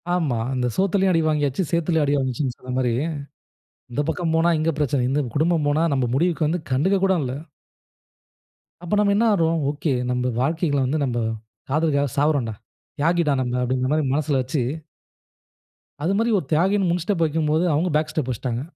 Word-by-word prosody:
ஆம்மா. 150 Hz, -10 st, 0 dB, 0.2 s
"அந்த 125 Hz, -1 st, 0 dB
சோத்துலயு 195 Hz, 0 st, +2 dB
அடி 165 Hz, -, +3 dB
வாங்கியாச்சு, 150 Hz, +1 st, 0 dB
சேத்துலயும் 170 Hz, -2 st, +1 dB
அடி 145 Hz, +1 st, +1 dB
வாங்கியாச்சுனு" 130 Hz, -1 st, -2 dB
சொன்ன 125 Hz, 0 st, -7 dB
மாரி, 125 Hz, -2 st, +1 dB, 1.0 s
இந்த 140 Hz, -, -1 dB
பக்கம் 165 Hz, 0 st, -1 dB
போனா 165 Hz, +1 st, +3 dB
இங்க 155 Hz, +1 st, +1 dB
பிரச்சன. 140 Hz, -3 st, +1 dB
இந்த 140 Hz, +3 st, +1 dB, 0.2 s
குடும்பம் 160 Hz, 0 st, +2 dB
போனா 150 Hz, +3 st, +2 dB
நம்ம 130 Hz, -2 st, +1 dB
முடிவுக்கு 165 Hz, +1 st, +1 dB
வந்து 170 Hz, +4 st, -1 dB
கண்டுகக் 185 Hz, +9 st, +2 dB
கூட 190 Hz, -, +3 dB
இல்ல. 125 Hz, -, -3 dB, 1.5 s
அப்ப 175 Hz, -, -4 dB
நம்ம 205 Hz, -1 st, +3 dB
என்ன 230 Hz, -, +3 dB
ஆகுறோம்? 165 Hz, -3 st, +1 dB
ஓகே 150 Hz, +1 st, -2 dB, 0.2 s
நம்ம 125 Hz, 0 st, 0 dB
வாழ்க்கைள 155 Hz, +2 st, 0 dB
வந்து 140 Hz, +5 st, 0 dB
நம்ப 120 Hz, -2 st, -1 dB, 0.5 s
காதலுக்காக 145 Hz, -1 st, +1 dB
சாவுரோண்டா. 140 Hz, -7 st, +1 dB, 0.4 s
தியாகிடா 165 Hz, -1 st, +2 dB
நம்ம 125 Hz, -1 st, -2 dB
அப்டிங்கிற 130 Hz, +1 st, 0 dB
மாரி 155 Hz, 0 st, +1 dB
மனசில 145 Hz, -1 st, +1 dB
வச்சு 130 Hz, +2 st, -2 dB, 1.4 s
அது 180 Hz, +5 st, +1 dB
மாரி 230 Hz, +2 st, +1 dB
ஒரு 175 Hz, -, -3 dB
தியாகினு 190 Hz, +4 st, +2 dB
முன் 175 Hz, +1 st, 0 dB
ஸ்டெப் 185 Hz, -4 st, 0 dB
வைக்கும்போது 155 Hz, +1 st, +1 dB
அவங்க 170 Hz, +5 st, +1 dB
பேக் 155 Hz, +1 st, -2 dB
ஸ்டெப் 155 Hz, -5 st, -2 dB
வச்சுட்டாங்க. 120 Hz, 0 st, -3 dB
155 Hz, 165 wpm, -22 LUFS, 130-170 Hz, 1.5 s, அடி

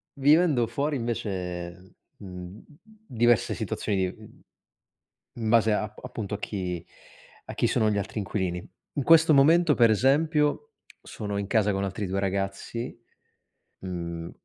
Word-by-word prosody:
Vivendo 145 Hz, -3 st, +4 dB
fuori 145 Hz, +4 st, -1 dB
invece, 90 Hz, -6 st, -4 dB, 0.2 s
mhmm, 90 Hz, +1 st, -9 dB, 0.2 s
diverse 125 Hz, -, 0 dB
situazioni 100 Hz, -, -2 dB
di, 95 Hz, -1 st, -1 dB
mhmm, 110 Hz, -1 st, -16 dB, 1.0 s
in 110 Hz, -, 0 dB
base 110 Hz, -1 st, +4 dB
a 105 Hz, -, 0 dB
a 105 Hz, -, -7 dB
appunto 105 Hz, -2 st, -6 dB
a -, -, -7 dB
chi 90 Hz, -5 st, -4 dB, 0.6 s
a -, -, -6 dB
chi -, -, +1 dB
sono 110 Hz, -, +2 dB
gli 105 Hz, -, 0 dB
altri 100 Hz, -, -6 dB
inquilini. 95 Hz, -3 st, -3 dB, 0.3 s
In 140 Hz, -, -2 dB
questo 165 Hz, +1 st, +6 dB
momento, 155 Hz, +3 st, +5 dB
per 115 Hz, -2 st, +5 dB
esempio, 150 Hz, -, +2 dB, 0.3 s
sono 105 Hz, -2 st, -5 dB
in 100 Hz, -, -2 dB
casa 105 Hz, -1 st, +2 dB
con 95 Hz, 0 st, -1 dB
altri 100 Hz, +1 st, -3 dB
due 95 Hz, +2 st, -2 dB
ragazzi, 100 Hz, +5 st, -3 dB, 0.8 s
mhmm 85 Hz, -2 st, -5 dB
105 Hz, 140 wpm, -26 LUFS, 95-135 Hz, 1.0 s, questo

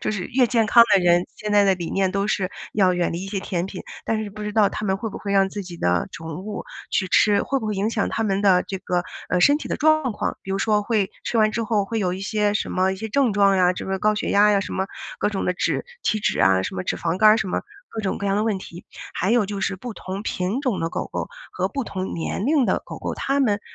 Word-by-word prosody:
就 -, -, -1 dB
是 185 Hz, -4 st, -3 dB
越 250 Hz, 0 st, +3 dB
健 230 Hz, -1 st, +2 dB
康 235 Hz, +2 st, +7 dB
的 195 Hz, -, +5 dB
人， 175 Hz, 0 st, +4 dB
现 210 Hz, 0 st, -4 dB
在 205 Hz, -1 st, +5 dB
的 195 Hz, -1 st, +4 dB
理 175 Hz, -2 st, -5 dB
念 190 Hz, -1 st, +1 dB
都 200 Hz, 0 st, 0 dB
是 190 Hz, -3 st, 0 dB, 0.3 s
要 185 Hz, -3 st, +3 dB
远 175 Hz, -1 st, 0 dB
离 175 Hz, +3 st, -4 dB
一 -, -, -7 dB
些 195 Hz, -1 st, -3 dB
甜 180 Hz, -1 st, -2 dB
品。 190 Hz, -1 st, -7 dB, 0.2 s
但 220 Hz, -1 st, -1 dB
是 205 Hz, -, -6 dB
不 210 Hz, +1 st, -8 dB
知 210 Hz, -, -3 dB
道 210 Hz, -2 st, +4 dB
他 -, -, -5 dB
们 190 Hz, -, +1 dB
会 220 Hz, +2 st, -4 dB
不 -, -, -7 dB
会 200 Hz, -, -4 dB
让 195 Hz, -1 st, +4 dB
自 205 Hz, +1 st, -5 dB
己 175 Hz, -1 st, -9 dB
的 90 Hz, -1 st, +1 dB
宠 160 Hz, -1 st, -7 dB
物 210 Hz, 0 st, -5 dB, 0.3 s
去 190 Hz, -, 0 dB
吃， 205 Hz, +2 st, +4 dB
会 275 Hz, -, -1 dB
不 220 Hz, -, -4 dB
会 210 Hz, -, -1 dB
影 200 Hz, +3 st, 0 dB
响 225 Hz, -3 st, 0 dB
他 225 Hz, -, -2 dB
们 195 Hz, -1 st, 0 dB
的 185 Hz, -3 st, +5 dB
这 190 Hz, -, -5 dB
个， 180 Hz, -1 st, -1 dB, 0.3 s
呃， 180 Hz, -, +2 dB
身 285 Hz, +9 st, +5 dB
体 -, -, -7 dB
的 -, -, -1 dB
状 310 Hz, -4 st, +3 dB
况？ -, -, -3 dB
比 195 Hz, -, -8 dB
如 195 Hz, -, -1 dB
说 210 Hz, 0 st, +2 dB
会 205 Hz, -2 st, 0 dB
吃 -, -, -2 dB
完 215 Hz, 0 st, +4 dB
之 230 Hz, 0 st, -1 dB
后 210 Hz, -2 st, +1 dB
会 225 Hz, +3 st, -3 dB
有 185 Hz, -4 st, 0 dB
一 190 Hz, -, -7 dB
些 210 Hz, +1 st, 0 dB
什 -, -, -1 dB
么 185 Hz, +1 st, +1 dB
一 -, -, -5 dB
些 220 Hz, +3 st, -5 dB
症 260 Hz, 0 st, +2 dB
状 200 Hz, -1 st, +4 dB
啊， 180 Hz, -1 st, +4 dB
这 185 Hz, -, -6 dB
个 190 Hz, 0 st, -1 dB
高 215 Hz, +2 st, +2 dB
血 210 Hz, -, -2 dB
压 210 Hz, +1 st, +5 dB
呀， 200 Hz, -, +3 dB
什 195 Hz, -, -5 dB
么 190 Hz, -, -1 dB, 0.3 s
各 -, -, +1 dB
种 195 Hz, -, -2 dB
的 180 Hz, -, +1 dB
脂 -, -, -1 dB, 0.2 s
体 215 Hz, -, +1 dB
脂 -, -, 0 dB
啊， 95 Hz, -1 st, +4 dB
什 -, -, -4 dB
么 90 Hz, -, -3 dB
脂 -, -, -1 dB
肪 180 Hz, -, -2 dB
肝 215 Hz, 0 st, +7 dB
儿， 215 Hz, -, +6 dB
什 195 Hz, -, -2 dB
么 -, -, -1 dB, 0.3 s
各 220 Hz, -, -4 dB
种 195 Hz, -, -1 dB
各 200 Hz, -, -3 dB
样 195 Hz, -, +1 dB
的 210 Hz, -, +1 dB
问 215 Hz, -3 st, 0 dB
题。 175 Hz, -1 st, -11 dB, 0.3 s
还 195 Hz, -, 0 dB
有 235 Hz, -2 st, +4 dB
就 200 Hz, 0 st, -4 dB
是 195 Hz, 0 st, -1 dB
不 240 Hz, +4 st, -7 dB
同 190 Hz, +1 st, -6 dB
品 195 Hz, +4 st, -2 dB
种 255 Hz, -8 st, -1 dB
的 165 Hz, -, 0 dB
狗 -, -, -4 dB
狗 -, -, -3 dB, 0.2 s
和 -, -, -1 dB
不 275 Hz, -3 st, -3 dB
同 190 Hz, -3 st, -4 dB
年 180 Hz, +5 st, -3 dB
龄 285 Hz, -3 st, +3 dB
的 -, -, +1 dB
狗 -, -, -7 dB
狗， -, -, -4 dB
它 275 Hz, +1 st, 0 dB
们 205 Hz, -6 st, +2 dB
200 Hz, 315 characters per minute, -23 LUFS, 185-215 Hz, 0.3 s, 康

